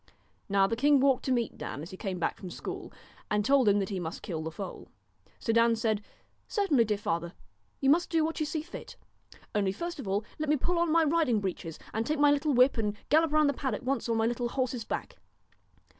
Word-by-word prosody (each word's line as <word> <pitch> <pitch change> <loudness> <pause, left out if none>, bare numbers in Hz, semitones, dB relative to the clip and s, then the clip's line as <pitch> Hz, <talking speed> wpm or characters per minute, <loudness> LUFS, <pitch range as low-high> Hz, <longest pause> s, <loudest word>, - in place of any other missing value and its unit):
Now 195 0 +4
the 230 - 0
king 285 +4 +4
walked 265 -1 +3
to 265 - 0
meet 240 -3 -1
Dan 145 - -5
as 170 - -9
he - - -7
came 190 -2 -3
back 175 - -1
from 185 - -8
school, - - -6 0.4
and 210 -1 +1
told 270 -3 +5
him 200 - +4
that 195 -2 -1
he 195 -3 -2
must 165 -1 -5
kill 160 -4 -4
the 160 - -3
foal. 190 +4 -7 0.5
So 225 - -1
Dan 230 0 +4
said: 220 -2 0 0.3
' - - -42
Certainly, 315 - +2
dear 210 -1 0
father, 170 -3 -2 0.5
you 270 0 +5
must 345 +3 +3
do 325 -2 +2
what 325 +1 -3
you 310 - 0
see 310 0 -3
fit; 350 - -9 0.6
only 200 -3 +1
first 340 - -5
of 250 - -6
all 200 +3 0
let 305 -1 -2
me 300 - +4
pull 345 +5 0
on 340 -2 +2
my 330 0 +5
riding 305 -7 +2
breeches, 180 -4 -4 0.2
and 220 - 0
take 305 +6 -1
my 290 0 +5
little 290 -1 +1
whip 250 0 +5
and 210 -1 -1
gallop 315 +1 +4
round 305 -1 +4
the 285 - +2
paddock 260 -3 -3
once 265 -1 -1
on 230 - +2
my 225 - +2
little 240 +1 -1
horse's 255 -3 -2
back.' - - -5
240 Hz, 235 wpm, -29 LUFS, 205-295 Hz, 0.6 s, told